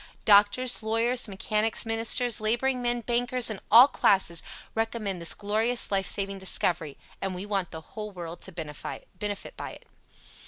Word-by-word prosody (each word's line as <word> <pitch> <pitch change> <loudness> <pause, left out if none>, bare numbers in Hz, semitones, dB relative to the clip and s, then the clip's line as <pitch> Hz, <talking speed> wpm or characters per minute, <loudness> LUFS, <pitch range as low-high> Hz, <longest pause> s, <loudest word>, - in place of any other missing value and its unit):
Doctors, 210 +5 +4
Lawyers, 230 +3 +1
Mechanics, 210 +3 0
Ministers, 225 +1 +1
Laboring 245 +4 0
Men, 240 0 0
Bankers 245 0 +1
and 205 - -5
all 240 +5 +9
classes 190 - +2 0.3
recommend 220 -5 -2
this 170 - -2
glorious 220 +4 0
life 195 -1 +1
saving 195 -1 -1
discovery, 170 -5 +1 0.2
and 190 -1 -3
we 185 +2 -6
want 195 -4 -2
the 160 - -8
whole 210 +5 -8
world 175 -3 -8
to 190 - -6
benefit 180 +5 -7
by - - -6
it. - - -15
210 Hz, 150 wpm, -27 LUFS, 190-235 Hz, 0.3 s, all